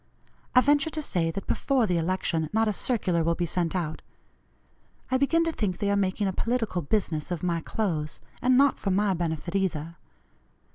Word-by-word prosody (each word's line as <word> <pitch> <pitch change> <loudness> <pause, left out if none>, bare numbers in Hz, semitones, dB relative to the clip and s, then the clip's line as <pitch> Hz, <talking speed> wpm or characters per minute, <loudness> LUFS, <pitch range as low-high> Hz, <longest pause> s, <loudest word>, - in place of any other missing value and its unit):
I 250 - +8
venture 290 +2 +3
to 315 0 -3
say, 170 - 0
that 195 +4 -5
before 265 -4 +1
the 180 -4 +1
election 165 -2 -1
not 220 +1 +2
a 215 - +1
circular 185 -7 0
will 170 +1 +1
be 175 - -1
sent 170 +1 -1
out. 160 -4 -2 1.1
I 260 - +3
begin 330 +4 +3
to 330 - 0
think 205 - -2
they 205 -1 0
are - - +2
making 200 +1 0
a 190 - 0
political 225 -4 -1
business 160 -2 -1
of 175 -2 -4
my 170 -2 0
clothes, 160 -7 -2 0.2
and 250 0 +4
not 280 0 +4
for 200 - -2
my 195 +1 +2
benefit 170 -1 -3
either. 170 -4 -1
190 Hz, 190 wpm, -27 LUFS, 170-225 Hz, 1.1 s, I